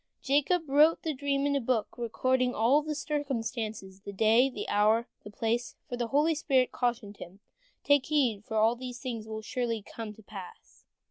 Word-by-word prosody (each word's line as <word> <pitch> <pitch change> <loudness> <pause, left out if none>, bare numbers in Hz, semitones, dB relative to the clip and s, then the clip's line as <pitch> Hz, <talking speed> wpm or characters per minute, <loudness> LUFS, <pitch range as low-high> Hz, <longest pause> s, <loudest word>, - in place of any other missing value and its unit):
Jacob 295 +5 +2
wrote 300 +4 +4
the 315 - -1
dream 280 0 -1
in 285 0 +1
a 280 - +1
book, 235 -2 -1
recording 250 +2 0
all 245 +7 +4
the 305 0 -4
circumstances, 230 -10 -3
the 200 - -7
day, 225 +6 +4
the 210 -5 -6
hour, 210 +2 +4
and 235 - -5 0.2
the - - -9
place, 235 +2 -1
for 245 - -4
the 240 -1 -2
holy 295 +6 +3
spirit 270 -4 +1
cautioned 235 -5 -2
him, 185 +3 -11 0.4
"Take 285 -2 +3
heed, 255 -9 +1 0.4
these 250 -1 -6
things 235 -5 -5
will 220 0 -6
surely 230 -2 -2
come 225 +1 -7
to 220 - -16
pass." 195 -3 -12
245 Hz, 180 wpm, -29 LUFS, 220-280 Hz, 0.4 s, wrote